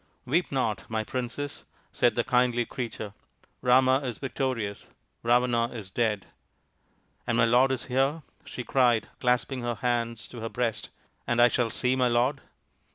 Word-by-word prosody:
" - - -43
Weep 160 +7 +1
not, 115 -7 -1
my 110 -1 -1
Princess," 130 +4 -4 0.3
said - - +2
the - - +1
kindly 125 -1 +2
creature. 110 -5 -5 0.3
" - - -35
Rama 130 +1 +5
is 125 -5 -4
victorious. 130 -7 -3 0.3
Ravana 120 0 +3
is 110 -6 -9
dead." 105 -3 0 0.5
" - - -41
And - - +1
my - - +5
lord 125 +3 +4
is 130 -2 -2
here? 135 +5 0
" - - -40
she 125 - -6
cried, 120 -3 +2
clasping 125 +1 +1
her 120 0 -2
hands 115 0 -1
to 120 - -9
her 115 0 -4
breast, 115 -3 -2 0.2
" - - -42
and 120 0 +1
I 120 0 +7
shall 120 -2 +1
see 125 +3 0
my 130 -1 +3
lord 125 +4 +1
120 Hz, 175 wpm, -27 LUFS, 115-130 Hz, 0.5 s, I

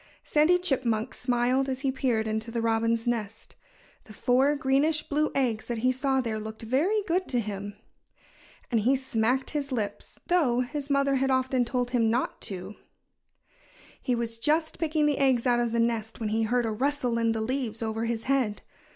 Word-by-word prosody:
Sandy 310 +4 +4
Chipmunk 250 -9 0
smiled 250 +2 +1
as 260 0 -3
he 270 -2 +1
peered 240 -4 0
into 220 +1 -2
the 230 0 -2
robin's 230 0 +1
nest. 220 -3 -3 0.5
The 215 - -13
four 260 +7 +2
greenish 290 +3 +2
blue 300 +1 +1
eggs 235 -5 0
that 240 - -2
he 255 - +5
saw 265 +1 +1
there 225 -3 -3
looked 220 +1 -7
very 325 - +1
good 370 +1 0
to 245 - +1
him. 205 -2 -5 1.0
And 230 - +3
he 250 +6 +3
smacked 260 0 0
his 285 -2 -3
lips 220 -5 -4
though 280 -9 +2
his 280 +3 -4
mother 275 -1 +2
had 270 +1 +1
often 260 -1 +1
told 245 0 -2
him 230 -3 +2
not 240 +3 -1
to. 190 +1 -6 1.3
He 250 - 0
was 230 -1 -2
just 315 +5 +1
picking 310 -2 +1
the 295 -1 +1
eggs 265 -3 +3
out 240 -1 +3
of 240 -1 0
the 235 - 0
nest 230 -1 -1
when 220 -2 -2
he 220 +1 0
heard 240 +2 +1
a 225 - -1
rustle 250 0 0
in 230 -1 +2
the 225 - -2
leaves 235 -2 -2
over 225 +1 -2
his 230 -1 -2
head. 260 -6 0
245 Hz, 185 wpm, -27 LUFS, 225-275 Hz, 1.3 s, he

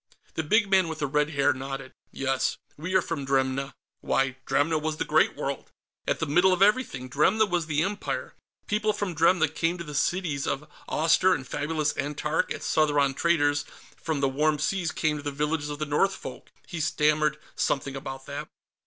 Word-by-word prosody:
The - - -1
big 205 +7 +3
man 190 -2 +4
with 160 -1 -4
the 150 - -1
red 150 +1 +1
hair 145 -2 +2
nodded. 135 0 -6 0.2
"Yes. 135 -1 0 0.2
We 175 +5 -4
are 185 - +5
from 160 -4 -3
Dremna." 135 0 0 0.2
Why, 135 -1 0
Dremna 155 +2 +2
was 155 0 -2
the - - -1
Great - - +3
World, - - -4 0.4
at - - +1
the - - 0
middle 175 +6 +4
of 185 +1 +4
everything! 205 - +2
Dremna 185 - +3
was 175 -3 -1
the 155 0 +1
Empire. 200 +2 -3 0.3
People 215 +1 +1
from 205 -3 -3
Dremna 165 +1 +4
came 165 +3 -1
to 170 - -5
the 150 -3 -8
cities 150 -2 0
of 150 +3 -2 0.2
Awster 165 +4 +4
and 130 -2 -7
fabulous 150 +1 -1
Antark 150 +2 -1
as - - -4
Southron 145 -3 +2
traders 145 -2 +2 0.3
from 155 -3 -3
the 140 - +3
Warm 150 +3 +1
Seas 175 +3 -1
came 155 -1 0
to 145 - -8
the 145 - -2
villages 150 +1 -1
of 145 - -4
the 155 - -2
Northfolk. 150 +7 -1 0.2
He 170 - -6
stammered 150 0 +2 0.2
something 140 -1 -1
about 135 0 -6
that. 145 +2 -6
150 Hz, 190 wpm, -27 LUFS, 140-170 Hz, 0.4 s, are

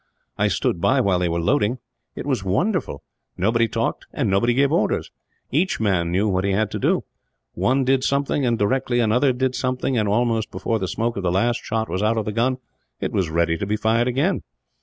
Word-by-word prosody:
I - - +1
stood 85 - -1
by 130 +8 +3
while 100 -7 +2
they 90 -1 0
were 85 +1 -1
loading. 120 +5 +1 0.4
It - - -6
was 130 -8 -1
wonderful. 175 - -1 0.3
Nobody 115 +5 +2
talked, 115 +1 -2
and 120 -9 -1
nobody 120 +5 +2
gave 140 +1 +3
orders. 165 - 0 0.4
Each 175 +8 +1
man 95 -6 +1
knew 100 +4 +1
what 95 -2 0
he 100 0 +1
had 105 +1 0
to - - -3
do - - +1 0.5
one 130 +2 +1
did 130 0 +2
something 140 +1 0
and, 120 -2 +1
directly, 120 +3 +1
another 120 +4 +3
did 130 +1 -1
something 130 -1 -1
and, 105 -1 0
almost 115 0 +1
before 115 -1 -2
the 95 - -2
smoke 115 +4 -2
of - - -2
the 90 -2 0
last 120 +6 +1
shot 110 0 -2
was 95 - -2
out 110 +2 +1
of 110 - -1
the 105 - -2
gun, 120 +4 +1 0.4
it - - -2
was 90 -4 0
ready 85 0 +1
to 100 - -3
be 105 +1 0
fired 115 +3 +1
again. 140 +10 +1
115 Hz, 215 wpm, -22 LUFS, 100-130 Hz, 0.5 s, by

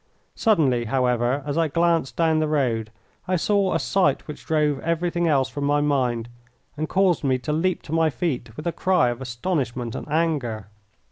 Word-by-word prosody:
Suddenly, 140 - +2
however, 125 +2 +1
as 145 +2 -1
I 165 - +3
glanced 165 -2 +1
down 160 -2 +2
the 155 - +1
road, 120 -7 0 0.4
I 185 - +1
saw 200 +2 +1
a - - +2
sight 165 -8 +1
which 150 -2 -9
drove 150 -3 +1
everything 170 +1 -1
else 135 -4 +2
from 145 +1 -4
my 145 +1 +2
mind, 125 -6 0 0.5
and 155 +1 -3
caused 190 -4 +2
me 130 -2 +2
to 150 +4 -3
leap 175 +3 0
to 150 - -10
my 160 0 +3
feet 130 -6 -3
with 150 - -7
a 170 - +1
cry 180 -8 +2
of 120 +2 -5
astonishment 125 -2 -3
and - - -7
anger. 140 - -1
150 Hz, 185 wpm, -23 LUFS, 125-165 Hz, 0.5 s, I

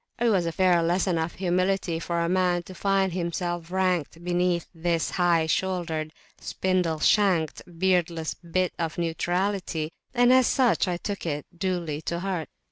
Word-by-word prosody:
It 240 0 +3
was 185 -5 +2
a - - -1
fair 180 0 +3
lesson 175 +1 +1
of 160 +1 -3
humility 185 -1 0
for 170 0 -2
a 170 - +1
man 180 -1 +1
to 185 - -11
find 195 -1 +1
himself 175 -1 -3
ranked 180 -3 -1
beneath 175 0 +1
this 165 -1 -1
high 175 -3 +2
shouldered, 165 -3 -1 0.3
spindle 180 -4 -1
shanked, 180 -4 +2 0.2
beardless 170 -3 +1
bit 180 +1 -2
of 165 -1 -2
neutrality; 175 0 -1 0.2
and 245 +1 +5
as 255 -1 +5
such 245 -6 +2
I 175 -1 -1
took 200 -1 -5
it 145 -2 -3
duly 170 -5 -2
to 170 +1 -3
heart. 180 -6 -3
175 Hz, 155 wpm, -26 LUFS, 165-185 Hz, 0.3 s, and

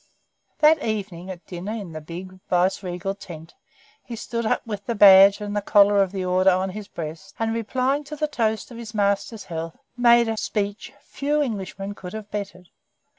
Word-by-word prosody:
That 310 0 +5
evening, 195 -5 -4
at 185 -2 -8
dinner 185 +4 -6
in 205 -6 -6
the 155 0 -7
big 185 +4 -9
Viceregal 180 +1 0
tent, 165 -5 -11 0.5
he 235 - -7
stood 230 0 -3
up - - 0
with 205 -3 -6
the 235 - -1
badge 195 -1 +8
and 205 0 -5
the 205 - 0
collar 205 0 +5
of 190 -2 +1
the 190 -2 -3
Order 185 +1 +3
on 185 +1 +1
his 205 +1 -8
breast, 165 +3 -8
and 225 0 -1
replying 255 +5 0
to 300 - -7
the 305 +1 -1
toast 225 -5 -1
of 235 - -9
his 225 -1 -9
master's 200 +2 0
health, 165 -1 -6 0.2
made 235 -1 +5
a 225 0 -2
speech 205 -1 -3
few 295 +1 -1
Englishmen 200 -4 -5
could 185 -2 -9
have 215 -1 -8
bettered. 190 -4 -6
200 Hz, 185 wpm, -23 LUFS, 185-225 Hz, 0.5 s, badge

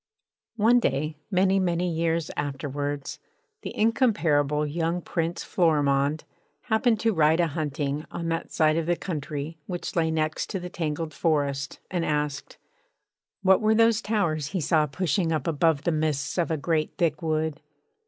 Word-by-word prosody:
One 230 +3 +5
day, 155 - -1
many, 190 0 +3
many 180 -1 0
years 165 -1 0
afterwards, 145 0 -3 0.4
the - - -7
incomparable 165 - +2
young 165 +3 -1
Prince 170 -1 -2
Florimond 145 -3 +2 0.4
happened 220 0 +2
to 225 -1 +2
ride 160 -1 +3
a 175 - +4
hunting 150 -1 -2
on 170 - -5
that 165 0 -3
side 155 0 +3
of 165 -1 -1
the 175 - +2
country 155 -2 -5
which 175 -2 -5
lay 165 -2 +2
next 155 -1 -1
to 190 - -3
the 180 0 -6
tangled 160 -1 -3
forest, 140 -4 -1
and 175 -2 0
asked: 150 -2 -2 0.9
'What 190 +1 +5
were 215 0 +3
those 230 0 +4
towers 170 -10 0
he 190 +4 -2
saw 155 0 +2
pushing 170 +2 0
up 155 -4 -1
above 160 -2 +2
the 170 - +1
midst 155 -3 -1
of 170 - +1
a 160 - 0
great 155 +1 -1
thick 165 -2 +1
wood? 155 -1 -1
160 Hz, 155 wpm, -26 LUFS, 150-175 Hz, 0.9 s, One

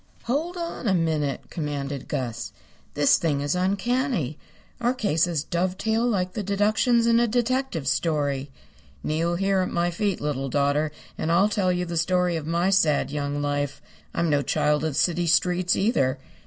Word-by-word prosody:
"Hold 315 +9 -2
on 335 -8 -4
a 190 - +3
minute," 155 -5 0
commanded 145 -3 -4
Gus. 120 -5 -3 0.4
"This 145 -1 +4
thing 150 -4 0
is 145 +1 0
uncanny. 195 - 0 0.4
Our 240 +2 +1
cases 170 - +1
dovetail 190 +8 0
like 185 -5 0
the 215 - -3
deductions 215 +4 +2
in 230 0 +4
a 240 - +3
detective 245 - -1
story. 145 -2 0 0.5
Kneel 165 +3 0
here 195 +1 +1
at 185 - 0
my 175 0 0
feet, 195 +2 -1
little 135 -2 -2
daughter, 145 +3 +1 0.3
and 160 - 0
I'll 190 +5 +4
tell 195 -3 +1
you 180 0 -1
the 170 -1 -4
story 180 +1 +1
of 155 -2 -4
my 170 +3 +1
sad 155 -8 +2
young 145 0 -2
life. 145 -1 -2 0.3
I'm 170 - 0
no 145 -2 +2
child 150 +1 +1
of 160 -2 -1
the 140 - 0
city 175 -1 +1
streets, 180 +2 +2
either. 170 - +1
170 Hz, 170 wpm, -25 LUFS, 145-200 Hz, 0.5 s, This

